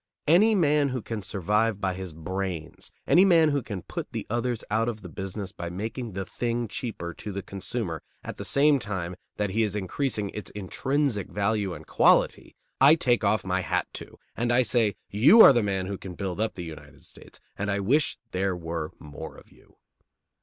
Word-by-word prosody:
Any 205 +8 +5
man 150 -5 +3
who 130 -3 -4
can 110 -2 -4
survive 105 +3 0
by 95 -2 -1
his 95 -1 -6
brains, 85 0 -5
any 180 - +6
man 165 -5 +5
who 140 -1 0
can 100 -7 -6
put - - -6
the - - -3
others 120 0 -1
out 115 +2 +2
of 110 -3 -7
the 90 - -8
business 95 +2 -5
by 85 -3 -6
making 110 +5 -5
the 95 +1 -4
thing 120 +4 -2
cheaper 105 -5 -5
to 105 - -7
the 100 0 -5
consumer 95 - -4 0.2
at - - -7
the - - -5
same 145 0 +4
time 95 -5 -4 0.2
that 105 -2 -1
he 110 +4 +1
is 105 -2 0
increasing 105 +1 -2
its 105 - -6
intrinsic 120 +3 -1
value 100 -2 -1
and 75 0 -11
quality, - - +3 0.2
I 140 +4 +8
take 120 -7 +1
off 105 0 +1
my 95 0 0
hat 90 - -1
to, - - -12 0.2
and 120 +1 0
I 125 +1 +4
say: 115 -4 +1 0.2
"You 145 - +7
are - - +9
the 120 - +3
man 95 -3 -1
who 100 0 -5
can 95 -3 -8
build 95 +1 -3
up 110 - -1
the 90 - -6
United 80 -2 -11
States, - - -13 0.2
and 105 +1 -3
I 100 0 0
wish 135 +10 +1
there 95 0 0
were 80 -2 -4
more 75 0 -9
of - - -17
you." - - -23
105 Hz, 200 wpm, -26 LUFS, 95-120 Hz, 0.2 s, are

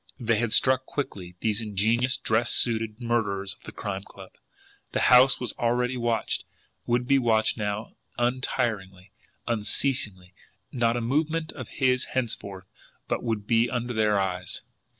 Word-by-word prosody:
They 115 -3 +1
had 120 -1 0
struck 130 +2 +3
quickly, 95 -11 -5
these 110 0 +1
ingenious, 110 +5 +1
dress 115 +2 +2
suited 115 -2 +1
murderers 105 -5 0
of - - -20
the - - -7
Crime 95 -1 -4
Club! 95 -1 -13 0.6
The - - +1
house 125 +1 +7
was 125 - -2
already 125 +2 +1
watched, 120 -2 0 0.4
would 120 +1 +1
be 140 0 +4
watched 110 -3 +2
now 105 0 -3 0.2
untiringly, 115 -6 -1 0.4
unceasingly; 105 -4 -1 0.4
not 120 -1 +1
a - - -1
movement 155 +6 0
of 130 -5 -8
his 130 -2 +1
henceforth 100 -6 -2 0.4
but - - -1
would 110 -4 -2
be 115 +1 +3
under 120 +1 -2
their 105 -2 +2
eyes! 90 -1 -3
115 Hz, 145 wpm, -26 LUFS, 105-125 Hz, 0.6 s, house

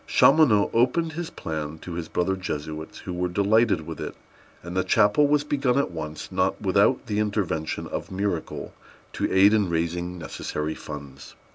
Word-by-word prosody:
Chaumonot 135 -9 +5
opened 145 +8 +2
his 170 0 -4
plan 80 -1 -5
to 85 +2 -8
his 85 -1 -4
brother 90 +3 0
Jesuits, 80 -3 -5
who 90 - -6
were 90 +1 -1
delighted 100 +2 +3
with 80 -1 -7
it, - - -5 0.5
and 85 +2 -7
the 95 - +2
chapel 110 +7 +4
was 145 0 +3
begun 135 -3 +1
at 140 - +1
once, 75 -1 -6
not 95 0 0
without 100 +6 +2
the 105 -3 -1
intervention 100 -7 -1
of - - -5
miracle 95 -3 -3 0.4
to - - -1
aid 100 +2 +6
in 105 -4 +2
raising 85 +1 -1
the 90 -2 -9
necessary 75 +1 -3
funds. 70 -3 -9
95 Hz, 170 wpm, -25 LUFS, 80-110 Hz, 0.5 s, aid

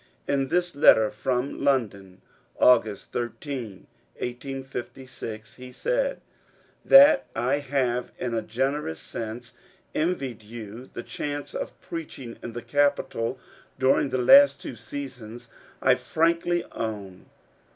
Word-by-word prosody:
In 135 -1 +1
this 175 +1 0
letter, 110 -6 +6
from 130 +1 -2
London, 100 -9 -1 0.4
August 110 -5 +3
13, 120 -4 -5 0.3
1856, 125 -3 -7
he 125 0 -10
said: - - -1 0.3
— - - -34
That 280 +1 +9
I 130 +4 +1
have, 130 -3 -1
in 125 -2 -3
a 115 - 0
generous 130 - -2
sense, 115 +2 -6 0.4
envied 140 -9 -1
you 110 +2 -9
the 120 - -7
chance 145 -1 -5
of - - -5
preaching 145 -8 -7
in 120 - -7
the 120 0 -6
capital 140 -4 0 0.4
during 130 +1 +3
the 130 - -1
last 275 - +7
two - - -7
seasons, 120 -1 -8 0.3
I - - +6
frankly 170 +1 +1
own. 100 -5 -6
125 Hz, 120 wpm, -26 LUFS, 115-145 Hz, 0.4 s, That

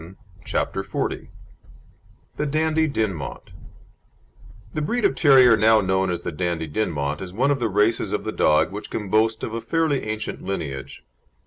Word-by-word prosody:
Fall] 85 +3 -12 0.3
CHAPTER - - -2
XL - - -1 1.3
THE 150 - -1
DANDIE 160 +2 +1
DINMONT 105 - -3 1.2
The 155 - -2
breed 230 +8 0
of - - +3
terrier 130 -4 +6
now 110 +1 +5
known 95 -1 +1
as 85 -1 -3
the - - -3
Dandie 85 0 -2
Dinmont 75 -4 -2
is 95 -2 -6
one 130 +7 +2
of 140 - 0
the 115 -2 0
races 105 +3 +1
of - - -2
the - - -3
dog 75 +4 +2
which 105 +2 -7
can 105 -3 -4
boast 110 +1 +2
of 110 - -4
a 115 - -3
fairly 150 +3 0
ancient 110 0 -4
lineage. 70 -8 -5
110 Hz, 165 wpm, -23 LUFS, 90-135 Hz, 1.3 s, terrier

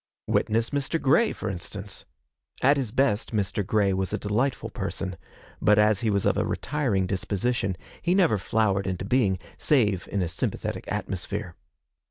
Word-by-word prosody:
Witness 115 +2 +1
Mr. 145 +3 0
Grey, 160 - +4
for 110 - -5
instance. 100 +1 -5 0.6
At 140 +3 +6
his 130 -6 -2
best 120 -3 +1
Mr. 100 0 0
Grey 100 0 +2
was 95 0 -1
a - - 0
delightful 120 +6 -1
person; 95 -1 -3 0.5
but 105 0 +5
as 105 0 +4
he 115 - +1
was 100 -2 +1
of - - +3
a - - +2
retiring 120 -11 0
disposition, 100 +1 -1 0.2
he 175 +2 +2
never 170 - +4
flowered 100 -1 +1
into 95 0 -2
being, 105 -4 +2 0.2
save 105 - +2
in 100 -2 +1
a - - -1
sympathetic 85 - -3
atmosphere. 95 -1 -3
105 Hz, 160 wpm, -26 LUFS, 95-125 Hz, 0.6 s, At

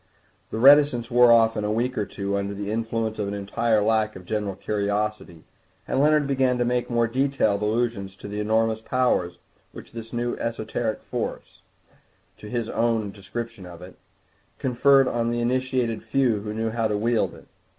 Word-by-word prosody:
The - - -5
reticence 135 -2 +5
wore 120 0 +6
off 115 -1 +5
in 105 - -2
a 105 - -1
week 120 +4 -1
or 105 - -2
two 100 0 -3
under 100 0 -2
the 100 +1 -4
influence 115 0 -2
of 105 - -1
an 100 - -3
entire 105 +2 0
lack 110 0 +1
of 90 - -11
general 105 -1 -2
curiosity, 105 -4 -3 0.4
and - - 0
Leonard 150 +1 +4
began 130 -2 +1
to 120 - +1
make 125 0 -1
more 120 -1 +2
detailed 125 -4 0
allusions 105 -3 -1
to 100 - -10
the 105 +1 -5
enormous 110 +1 +1
powers 110 -9 0 0.4
which - - -11
this 115 -1 -8
new 120 0 -2
esoteric 115 -1 -3
force, - - -5 0.8
to 105 - -10
use - - -10
his - - -9
own 115 -3 0
description 105 0 -7
of 85 0 -11
it, 90 - -12 0.6
conferred 135 +1 +4
on 115 -1 0
the 120 0 -1
initiated 125 -1 0
few 130 -6 +1
who 105 0 -5
knew 110 +1 -2
how 115 -1 0
to 105 -1 -1
wield 115 +1 0
it. - - -16
115 Hz, 180 wpm, -24 LUFS, 105-120 Hz, 0.8 s, wore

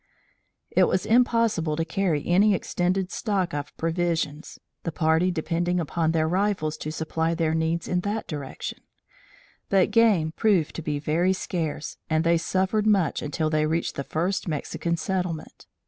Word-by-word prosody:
It - - +5
was 185 - 0
impossible 230 -9 +2
to 165 +1 -1
carry 165 -4 0
any 195 +4 +4
extended 180 +1 -1
stock 195 -5 -1
of 145 0 -5
provisions, 165 -2 -2 0.2
the 165 - -3
party 160 +3 +2
depending 175 +1 -1
upon 160 0 0
their 160 -1 +1
rifles 185 -3 0
to 155 - -5
supply 160 +1 -1
their 160 -1 +1
needs 160 +1 0
in 180 - +1
that 205 +4 -2
direction; 145 -5 -6 0.9
but 195 -2 +3
game 210 -9 +4
proved 185 -4 +2
to - - -3
be 150 -2 -2
very 165 +6 +1
scarce 160 -5 -3
and 160 0 +2
they 170 0 +3
suffered 190 +5 0
much 195 -7 +2
until 155 +1 -1
they 155 0 +2
reached 165 +2 -1
the 140 - -4
first 175 +8 -2
Mexican 170 +2 -2
settlement. 180 -1 -4
170 Hz, 155 wpm, -25 LUFS, 160-185 Hz, 0.9 s, It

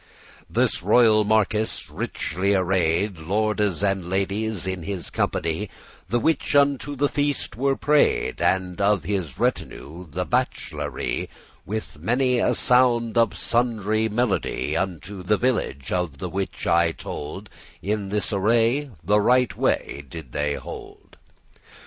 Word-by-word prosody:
This - - +1
royal 110 +2 +5
marquis, 110 0 +1
richely 100 +4 -1
array'd, 90 0 +1
Lordes 105 +2 0
and 95 -3 0
ladies 100 0 -1
in 95 -1 -3
his 90 -2 -5
company, 85 +5 -1 0.4
The 120 - +2
which 155 +2 0
unto 140 0 +2
the 145 +2 +2
feaste 145 -4 -2
were 135 +3 +1
pray'd, 150 +1 +2
And 95 0 0
of 100 -3 +3
his 90 -10 -3
retinue 85 +5 -3
the - - -3
bach'lery, - - -2 0.4
With 105 -7 -5
many 125 - +1
a - - +2
sound 120 -2 +3
of 115 -3 +2
sundry 110 -2 +1
melody, 110 -2 -1
Unto 95 +1 -3
the 105 +4 +1
village, 115 - -1
of 90 -6 -1
the 90 - -5
which 95 +2 -4
I 85 -1 +3
told, 80 +9 -7 0.4
In 100 0 -2
this 105 -1 -1
array 115 +7 +2
the 105 +5 +3
right 125 -3 +3
way 70 - -1
did 75 -4 -9
they 75 +1 -1
hold. - - -10
100 Hz, 130 wpm, -24 LUFS, 90-115 Hz, 0.4 s, royal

